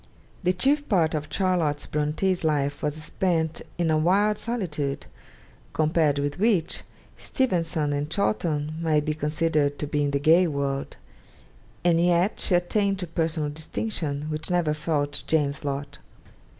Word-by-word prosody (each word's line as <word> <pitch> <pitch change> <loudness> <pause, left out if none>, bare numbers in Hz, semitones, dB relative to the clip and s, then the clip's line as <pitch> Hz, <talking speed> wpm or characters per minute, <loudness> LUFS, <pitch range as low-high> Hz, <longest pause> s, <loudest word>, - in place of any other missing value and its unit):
The 180 -1 +2
chief 285 +10 +1
part 170 -7 +3
of 150 -1 -2
Charlotte 170 -5 +1
Bronte's 155 +5 0
life 145 -2 0
was 150 -1 -1
spent 160 +1 -1 0.2
in 170 -2 +1
a 155 - +3
wild 205 +6 +3
solitude 155 -12 -2 0.7
compared 155 -2 +2
with 145 +3 -2
which 200 -6 +2 0.4
Steventon 165 - 0
and 145 +1 -2
Chawton 155 -5 -1
might 155 -2 +2
be 155 - 0
considered 150 -1 0
to - - -3
be 150 0 0
in 145 - +1
the 140 0 0
gay 165 +5 +5
world; 140 -2 -2 0.9
and 170 -1 +4
yet 175 +3 +2
she 180 - +2
attained 195 +3 +1
to 185 - -3
personal 160 -2 -1
distinction 155 -2 -3
which 155 0 -4
never 175 -4 +2
fell 150 -1 0
to 145 0 -5
Jane's 145 -3 +1
lot. 140 0 -4
155 Hz, 150 wpm, -25 LUFS, 145-180 Hz, 0.9 s, gay